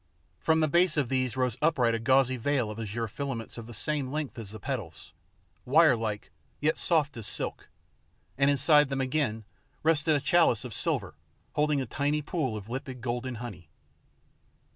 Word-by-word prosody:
From 160 0 +2
the 155 - +3
base 170 +1 +3
of 140 -5 +1
these 130 -1 0
rose 125 -2 0
upright 130 -7 +3
a 115 - 0
gauzy 130 +2 +3
veil 125 -2 0
of 105 - -7
azure 115 +1 -3
filaments 120 -1 -5
of 115 - -9
the - - -9
same 140 +2 -2
length 150 -4 -4
as 110 -4 -7
the 110 +1 -8
petals, 90 - -6 0.5
wirelike, 125 -8 +3 0.3
yet 155 +2 +1
soft 150 -6 +1
as 110 -3 -5
silk, - - -4 0.7
and 140 +1 +3
inside 145 +1 +4
them 135 -1 -2
again 130 -5 -1 0.4
rested 155 -1 +3
a - - +2
chalice 140 - +3
of 120 - -6
silver - - -1 0.4
holding 150 -1 +2
a - - -2
tiny 145 +5 -1
pool 140 - -2
of 105 -1 -9
limpid 130 +1 -5
golden 125 +1 -3
honey. 110 -7 -8
130 Hz, 170 wpm, -29 LUFS, 115-150 Hz, 0.7 s, inside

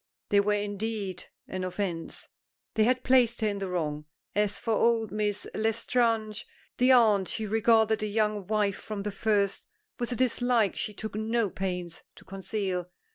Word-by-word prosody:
They 205 - +5
were 210 +1 +2
indeed 205 -2 -3 0.2
an 185 0 -4
offence. 180 -2 -4 0.5
They 215 - +3
had 255 +2 +2
placed 245 -3 +4
her 215 - +2
in 200 -1 -2
the 195 - -3
wrong. 150 -4 -2 0.3
As 205 -1 +1
for 225 - -1
old 225 -2 +2
Miss 210 -1 -1
L'Estrange, 225 -1 0 0.3
the 250 +1 +5
aunt, 215 -6 +5
she 220 - -3
regarded 220 0 +3
the 215 -1 -2
young 210 -2 0
wife 210 -2 +1
from 210 -2 -5
the 210 - -2
first 200 -1 0 0.3
with 240 0 -2
a - - 0
dislike 245 -4 +2
she 210 - -4
took 220 +1 -6
no 220 -1 0
pains 180 -3 -4
to - - -16
conceal. 190 -2 -3
210 Hz, 165 wpm, -28 LUFS, 195-225 Hz, 0.5 s, They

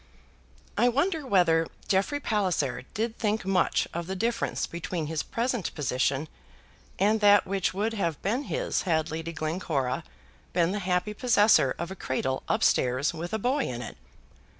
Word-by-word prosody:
I 245 - +5
wonder 300 +3 0
whether 165 -6 +3 0.2
Jeffrey 200 +10 +1
Palliser 185 - 0
did 225 +2 -2
think 215 -2 0
much 190 -1 +2
of 170 0 -4
the 190 - -3
difference 230 +4 -1
between 170 -1 -4
his 160 0 -2
present 240 -3 -2
position 135 +1 0 0.7
and 210 +3 +3
that 205 -1 +6
which 195 0 0
would 215 +3 0
have 170 -8 -1
been 240 +9 0
his - - -1
had 160 -1 +1
Lady 165 +1 -4
Glencora 155 -5 -2 0.5
been 175 0 +2
the 205 - -2
happy 180 +2 0
possessor 210 - +4
of 170 +2 -4
a - - -5
cradle 130 -4 -2
up - - +1
stairs 130 +6 +2
with 170 +2 -5
a 220 - 0
boy 255 +5 0
in 120 0 -4
it. - - -8
185 Hz, 160 wpm, -27 LUFS, 160-220 Hz, 0.7 s, that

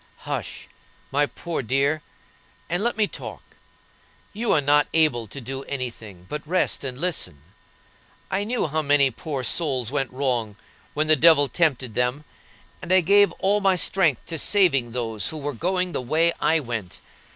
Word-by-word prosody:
"Hush, - - -5 0.4
my 145 +1 +2
poor 170 0 -5
dear, 140 +5 0 0.7
and 175 +4 0
let 240 0 0
me 215 - +3
talk. - - -8 0.9
You 225 +3 -1
are - - +4
not 145 +1 +3
able 140 -8 +3
to 140 - -7
do 135 +2 -6
any 130 -3 -3
thing, 100 -6 -14
but 150 +8 -5
rest, 180 0 0
and 130 -2 -5
listen. 145 - -2 0.9
I 195 +1 0
knew 235 +3 -1
how 155 0 -1
many 145 -2 +3
poor 135 +2 -5
souls 130 -3 0
went 135 -2 -1
wrong 125 -5 -1 0.4
when 155 +1 +1
the 155 0 +5
devil 150 -1 +5
tempted 135 -8 0
them; 125 +6 -1 0.6
and - - -5
I 185 0 +6
gave 200 +4 +5
all 205 +2 +1
my 190 -1 +3
strength 175 - +1
to 165 -2 -3
saving 145 - +3
those 115 -4 -2
who 160 - -6
were 145 -1 -4
going 180 +7 -1
the - - -3
way 160 +7 +1
I 160 +1 +3
went. 115 - -5
145 Hz, 170 wpm, -24 LUFS, 125-170 Hz, 0.9 s, I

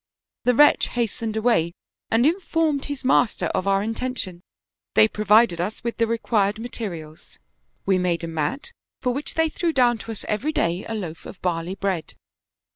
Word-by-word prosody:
The 250 0 +4
wretch 295 +3 +6
hastened 230 -1 -2
away 215 -8 +2 0.4
and 230 +3 +3
informed 325 -4 +1
his 285 -2 -5
master 245 -3 +3
of 185 - -1
our 195 0 +3
intention; 225 -5 -3 0.5
they 215 - +7
provided 210 -4 +3
us 205 +5 -4
with 235 0 -3
the 230 - +2
required 215 -3 +1
ma 235 +2 -6
terials; 165 -10 -7 0.5
we 190 -1 +3
made 175 -2 0
a - - -2
mat, 165 - -3 0.3
for 250 -1 0
which 280 +2 -4
they 320 0 +3
threw 330 +2 -1
down 245 -5 +3
to 230 - -7
us 220 - -6
every 250 +9 -1
day 175 - 0
a 225 - -2
loaf 170 -6 -6
of 190 - -10
barley 175 +1 -1
bread. 190 -5 -3
220 Hz, 175 wpm, -23 LUFS, 185-250 Hz, 0.5 s, they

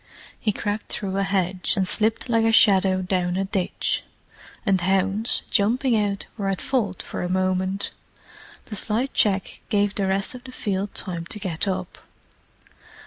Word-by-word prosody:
He 215 - +1
crept 205 +1 -3
through 195 -2 -2
a - - +2
hedge, 190 -2 0
and 190 -1 +1
slipped 220 +5 +1
like 230 -2 +2
a 225 - +4
shadow 190 -4 +5
down 180 -1 0
a 195 - 0
ditch; 190 -2 -1 0.6
and 195 -4 +3
hounds, 195 +4 +1
jumping 235 +4 +3
out, 205 -2 0
were 200 -2 -1
at 195 - -1
fault 225 -9 -1
for - - -5
a 180 - -2
moment. 185 +1 0 0.7
The 215 - -6
slight 225 +6 +1
check 195 -3 +1
gave 205 -2 +2
the 195 -2 -1
rest 195 +3 +2
of 250 -1 -10
the 255 - -8
field 200 -4 -3
time 170 -3 -2
to 210 - -3
get 185 -1 -2
up. 185 -2 -3
195 Hz, 165 wpm, -24 LUFS, 185-215 Hz, 0.7 s, shadow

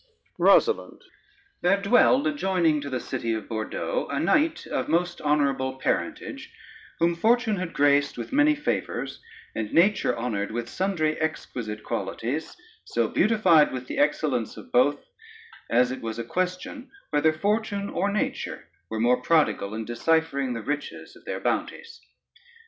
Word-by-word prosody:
ROSALYNDE 455 - +3 0.6
There 195 +3 +3
dwelled 245 +6 +4
adjoining 185 - +1
to 140 - -5
the 130 -2 -2
city 115 -3 -3
of 110 - -6
Bordeaux 115 - -3
a - - -1
knight 315 +1 +2
of - - -3
most 175 +1 0
honorable 140 -3 +1
parentage, - - -3 0.5
whom 170 +1 +2
fortune 225 +4 +2
had 180 -2 -4
graced 145 0 +2
with - - -6
many 295 +2 +4
favors, 295 - -3 0.3
and 110 -2 -4
nature 170 - +3
honored 110 -4 -2
with 120 +1 -4
sundry 165 -6 -1
exquisite 115 -8 -4
qualities, 145 - -4 0.3
so - - 0
beautified 185 -9 +4
with 130 -1 -5
the 275 - -4
excellence 140 - 0
of - - -12
both, 140 +4 +3 0.6
as 125 +2 +3
it 130 - -5
was 115 -1 -4
a 115 - -3
question 185 - -3 0.2
whether 150 +1 +3
fortune 205 +4 -1
or 200 +1 -1
nature 210 - -3 0.2
were 110 - -3
more 125 +2 +3
prodigal 125 -8 +1
in 110 0 -4
deciphering 140 +1 0
the 115 - -5
riches 150 +3 -5
of - - -18
their - - -4
bounties. 465 - -3
155 Hz, 145 wpm, -26 LUFS, 125-200 Hz, 0.6 s, dwelled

